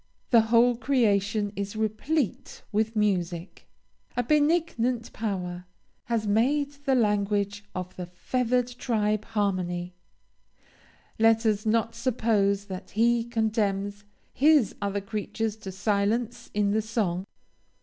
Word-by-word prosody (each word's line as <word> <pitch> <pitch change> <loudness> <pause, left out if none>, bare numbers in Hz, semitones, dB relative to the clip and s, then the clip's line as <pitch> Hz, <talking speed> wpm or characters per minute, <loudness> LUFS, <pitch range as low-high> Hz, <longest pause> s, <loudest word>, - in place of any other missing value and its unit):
The 230 -2 +7
whole 230 +2 +4
creation 210 -5 +1
is 200 +1 -4
replete 220 - -2
with 220 +2 0
music, 180 -4 -1 0.5
a 245 - +2
benignant 290 -5 +1
Power 180 -5 -3 0.4
has 230 -2 -1
made 270 +8 +2
the 270 -2 +3
language 205 -2 +1
of 185 0 -5
the 180 -1 -5
feathered 250 +7 0
tribe 215 -3 0
harmony; 185 -5 -1 1.3
let 225 +1 +4
us 215 0 +1
not 230 +1 +1
suppose 220 -5 +1
that 185 -1 -7
He 235 +2 +2
condemns 210 -3 -1 0.3
his 290 -4 +4
other 200 0 -1
creatures 215 +1 -3
to 200 -3 -7
silence 215 +5 -1
in 205 -1 +2
the 220 +1 +2
song. 205 -4 -2
215 Hz, 115 wpm, -27 LUFS, 200-235 Hz, 1.3 s, The